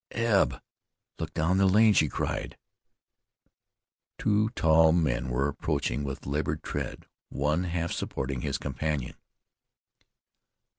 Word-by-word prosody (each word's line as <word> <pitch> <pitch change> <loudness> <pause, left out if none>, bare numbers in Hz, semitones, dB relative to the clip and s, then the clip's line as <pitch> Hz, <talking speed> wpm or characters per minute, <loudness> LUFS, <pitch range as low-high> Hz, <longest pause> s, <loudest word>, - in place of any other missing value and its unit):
"Eb, 115 -4 +2 0.6
look - - -4
down 90 +4 +2
the 95 - +5
lane!" 105 +3 +5
she 75 -6 +3
cried. - - -3 1.6
Two 105 +1 +2
tall 80 0 +5
men 65 -8 0
were 65 +3 +1
approaching 70 -2 -2
with 70 +1 -5
labored 75 +2 -2
tread, - - -5 0.2
one 75 +6 0
half 85 -1 -2
supporting 65 -2 -3
his - - -2
companion. 70 -1 -3
80 Hz, 110 wpm, -28 LUFS, 70-90 Hz, 1.6 s, the